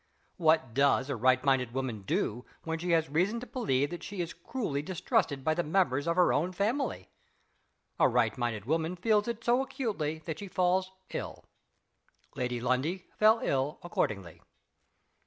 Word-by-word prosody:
What 155 -7 +3
does 140 +1 +3
a - - -1
right 130 +2 +3
minded 130 -4 +2
woman 130 -6 -2
do, 110 +4 -1 0.2
when 165 0 -3
she 180 +2 -3
has 160 -1 +3
reason 180 +10 +1
to 250 - -7
believe 145 - 0
that 175 - -6
she 200 -2 -7
is 170 -1 -2
cruelly 200 - -3
distrusted 175 - 0
by 155 - +2
the 175 - 0
members 155 -4 +1
of 170 - +2
her 180 0 +4
own 175 +5 0
family? 225 +10 -1 0.9
A - - +5
right 120 -3 +2
minded 115 -4 -2
woman 160 +5 0
feels 210 +3 +2
it 235 0 -4
so 245 +2 +3
acutely 205 - -2
that 160 -2 -4
she 200 - -6
falls 185 0 +1 0.2
ill. - - -5 0.9
Lady 125 -1 -2
Lundie 130 +10 -1
fell 220 +2 +5
ill 135 +2 0
accordingly. 100 - -2
160 Hz, 165 wpm, -30 LUFS, 130-190 Hz, 0.9 s, A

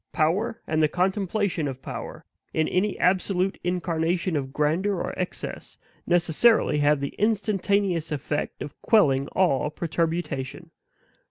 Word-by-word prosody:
Power, 200 +9 +1
and 155 0 0
the 155 - +5
contemplation 190 0 0
of 130 -1 -6
power, - - -7 0.3
in 155 0 +2
any 195 +3 0
absolute 185 +1 +1
incarnation 175 0 -1
of 135 -2 -2
grandeur 160 +8 +1
or 175 - -3
excess, 180 - -5 0.3
necessarily 175 0 +3
have 145 -1 +3
the 140 - -3
instantaneous 200 -5 +1
effect 150 0 -3
of 145 - -10
quelling 140 - +3
all 150 -6 +2
perturbation. 165 -1 -3
175 Hz, 120 wpm, -25 LUFS, 150-190 Hz, 0.3 s, the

